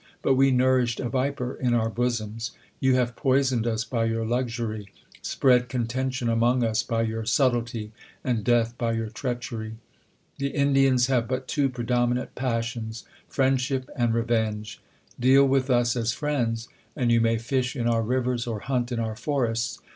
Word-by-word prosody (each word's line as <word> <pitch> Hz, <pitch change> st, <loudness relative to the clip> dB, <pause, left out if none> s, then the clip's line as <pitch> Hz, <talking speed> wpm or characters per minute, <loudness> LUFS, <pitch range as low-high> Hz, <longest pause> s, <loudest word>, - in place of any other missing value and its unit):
But 135 Hz, -, +4 dB
we 135 Hz, +1 st, +4 dB
nourished 125 Hz, -2 st, +2 dB
a 120 Hz, -, -2 dB
viper 130 Hz, -1 st, -1 dB
in 125 Hz, -2 st, 0 dB
our 115 Hz, -1 st, +2 dB
bosoms. 115 Hz, -1 st, -2 dB, 0.3 s
You 130 Hz, -1 st, +3 dB
have 120 Hz, -2 st, 0 dB
poisoned 130 Hz, -3 st, +1 dB
us 115 Hz, -1 st, 0 dB
by 115 Hz, -3 st, -1 dB
your 115 Hz, 0 st, -1 dB
luxury; 115 Hz, -3 st, -2 dB, 0.3 s
spread 125 Hz, -2 st, +2 dB
contention 125 Hz, +1 st, -2 dB
among 120 Hz, +2 st, +2 dB
us 110 Hz, -1 st, +1 dB
by 115 Hz, -1 st, -1 dB
your 115 Hz, 0 st, -2 dB
subtlety, 120 Hz, -3 st, 0 dB, 0.3 s
and 120 Hz, -4 st, 0 dB
death 120 Hz, +1 st, +2 dB
by 115 Hz, -2 st, 0 dB
your 115 Hz, -1 st, -3 dB
treach 120 Hz, +1 st, -4 dB
ery. 110 Hz, -1 st, -5 dB, 0.6 s
The 140 Hz, -, 0 dB
Indians 135 Hz, -3 st, +4 dB
have 125 Hz, -3 st, +1 dB
but 130 Hz, 0 st, -3 dB
two 140 Hz, -2 st, +1 dB
predominant 120 Hz, 0 st, -1 dB
passions, 115 Hz, -2 st, -3 dB, 0.2 s
friendship 130 Hz, 0 st, 0 dB
and 120 Hz, -2 st, +1 dB
revenge. 110 Hz, -2 st, -1 dB, 0.4 s
Deal 135 Hz, +3 st, +5 dB
with 135 Hz, 0 st, +1 dB
us 120 Hz, -1 st, +3 dB
as 115 Hz, -1 st, 0 dB
friends, 120 Hz, -6 st, -1 dB, 0.3 s
and 120 Hz, -2 st, +1 dB
you 115 Hz, 0 st, +4 dB
may 115 Hz, 0 st, +2 dB
fish 125 Hz, +3 st, -1 dB
in 120 Hz, -3 st, -2 dB
our 115 Hz, -1 st, +2 dB
rivers 125 Hz, +1 st, -1 dB
or 110 Hz, -3 st, -3 dB
hunt 125 Hz, -1 st, -1 dB
in 120 Hz, -, -1 dB
our 110 Hz, -1 st, -2 dB
forests. 120 Hz, -3 st, -1 dB
120 Hz, 165 wpm, -26 LUFS, 115-130 Hz, 0.6 s, Deal